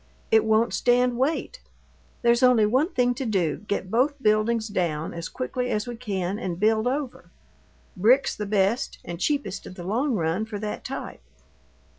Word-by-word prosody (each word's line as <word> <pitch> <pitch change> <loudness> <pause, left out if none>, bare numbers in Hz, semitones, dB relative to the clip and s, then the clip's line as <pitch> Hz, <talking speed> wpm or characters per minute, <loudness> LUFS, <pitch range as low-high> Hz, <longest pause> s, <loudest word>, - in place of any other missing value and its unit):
It 220 0 +5
won't 220 +2 +2
stand 245 0 +2
weight. 320 - -1 0.6
There's 235 +1 +4
only 250 -4 +5
one 260 - +2
thing 245 -1 +2
to 265 +2 -4
do: 185 - 0
get 195 -2 -2
both 265 +5 +2
buildings 215 -1 +2
down 170 -6 -2
as 170 0 -5
quickly 250 - -3
as 210 -2 -1
we 240 -1 -6
can, 200 -4 -3
and 180 -6 -4
build 220 +2 +2
over. 260 -9 -3 0.7
Brick's 245 +9 +3
the 210 - -4
best 200 +3 +1
and 170 -1 -6
cheapest 280 -6 -2
in - - -9
the 175 - -8
long 240 +8 0
run 170 +3 0
for 220 -2 -6
that 210 0 -5
type." - - -6
220 Hz, 170 wpm, -25 LUFS, 195-250 Hz, 0.7 s, It